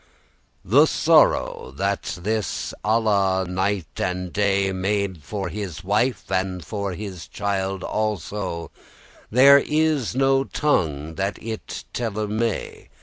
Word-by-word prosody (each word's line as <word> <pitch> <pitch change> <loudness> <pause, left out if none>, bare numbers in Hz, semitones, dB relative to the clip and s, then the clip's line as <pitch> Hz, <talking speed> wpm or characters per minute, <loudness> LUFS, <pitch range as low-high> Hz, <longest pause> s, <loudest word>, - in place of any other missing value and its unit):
The - - +6
sorrow - - +3
that 100 +1 -1
this 110 +3 -2
Alla 100 -4 +2
night 95 0 -1 0.2
and 90 -1 -2
day 100 -1 +2
Made 95 -2 -1
for 100 +6 -4
his 95 -6 -6
wife, 105 +7 +1
and 95 -3 -1
for 100 +2 -3
his 95 -2 -7
child 95 -2 -2
also, 105 -5 -3 0.6
There 140 +4 +8
is 150 -5 0
no 135 0 +3
tongue 80 - 0
that 100 +1 -1
it 110 -1 -6
telle 110 -3 -2
may. 110 +1 -3
100 Hz, 115 wpm, -23 LUFS, 95-110 Hz, 0.6 s, There